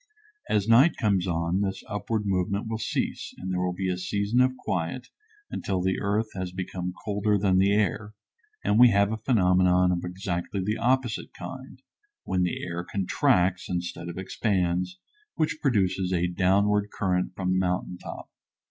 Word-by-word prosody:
As 105 -1 +1
night 125 +9 +6
comes 95 -4 +1
on 85 +2 0
this 95 -1 -2
upward 105 +1 -2
movement 100 +2 0
will 110 0 -3
cease 110 - -3
and 95 +1 -5
there 90 - 0
will 90 0 0
be 95 +1 -2
a 90 -1 -1
season 100 +6 +1
of 130 0 +2
quiet 95 +9 -3 0.4
until 95 -2 -2
the 95 +1 0
earth 105 +2 0
has 95 -1 -4
become 90 0 -4
colder 105 0 +1
than 95 -2 +3
the 100 +1 +4
air, 105 +1 0 0.5
and 105 - +2
we 125 0 +9
have 100 -1 +3
a 110 - -2
phenomenon 90 -5 +3
of 90 -1 -1
exactly 90 +1 -3
the 105 +4 -1
opposite 125 -1 0
kind, - - -9 0.4
when 95 -1 0
the 90 -1 -1
air 85 -1 -4
contracts 90 -1 +1
instead 85 -1 -4
of 85 - -7
expands, 95 - -1 0.4
which 155 -1 0
produces 95 -7 +1
a 90 -1 +1
downward 100 +3 +2
current 90 -2 -1
from 90 -1 -1
the 95 - +2
mountain 90 -1 -1
top. - - -9
95 Hz, 165 wpm, -26 LUFS, 90-105 Hz, 0.5 s, we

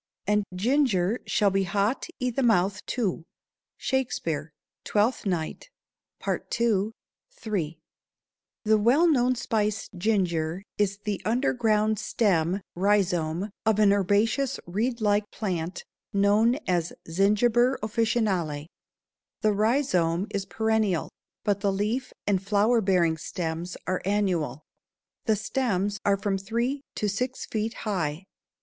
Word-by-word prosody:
"And 210 0 +2
ginger 225 -2 +2
shall 205 -2 +3
be 195 +1 +2
hot 205 +7 0
i' 250 -1 0
the 270 - -1
mouth, 205 -4 +2
too." 200 -9 -1 0.5
Shakespeare, 165 - -2 0.3
Twelfth 215 +1 +1
Night, 175 - -3 0.6
II., 220 -2 0 0.4
3. 200 - -3 0.9
The 215 0 +4
well 260 +11 +4
known 255 -5 +3
spice 215 -3 -1
ginger 180 -3 0 0.2
is 200 -1 +1
the 210 -2 -2
underground 220 -3 +1
stem 185 -3 +1
(rhizome) 185 -1 +1
of 220 -2 +2
an 205 -2 +5
herbaceous 205 +7 +1
reed 230 +7 -1
like 205 0 +2
plant 180 -5 -3 0.3
known 205 +4 +4
as 175 -2 0
Zingiber 220 +8 +3
officinale. 205 -9 0 0.7
The 215 -2 +3
rhizome 200 - +2
is 195 -1 -2
perennial, 220 -5 0 0.3
but 205 -2 +1
the 200 -1 +1
leaf 215 +6 -1
and 195 -3 +1
flower 210 +4 +3
bearing 175 -5 +2
stems 165 +1 -4
are 185 0 -1
annual. 175 -9 0 0.6
The 220 - +3
stems 205 -3 -1
are 200 -1 +3
from 195 -1 -1
three 235 +8 -1
to 210 - -1
six 250 +6 -2
feet 220 +1 -2
high. 170 -5 -1
205 Hz, 115 wpm, -26 LUFS, 185-225 Hz, 0.9 s, an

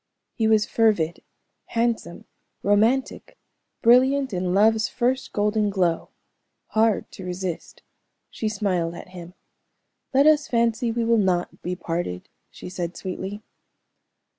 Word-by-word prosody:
He 225 -3 0
was 220 -1 +4
fervid, 205 -8 +1 0.4
handsome, 230 -7 -2 0.4
romantic, 225 +7 +1 0.5
brilliant 260 +2 +4
in 180 0 -1
love's 220 +3 +3
first 255 +1 -1
golden 210 0 +1
glow, 180 -4 0 0.6
hard 220 -1 +1
to 190 - -10
resist. 180 -1 -5 0.5
She 220 - -2
smiled 185 -5 -1
at 170 - -10
him. 180 0 -11 0.8
"Let 275 +2 +4
us 305 -1 +4
fancy 230 0 +1
we 230 0 -1
will 230 0 +3
not 180 -3 0
be 180 +1 -3
parted," 165 - -4 0.2
she - - -11
said 180 -1 -5
sweetly. 195 +2 -6
210 Hz, 120 wpm, -24 LUFS, 180-230 Hz, 0.8 s, was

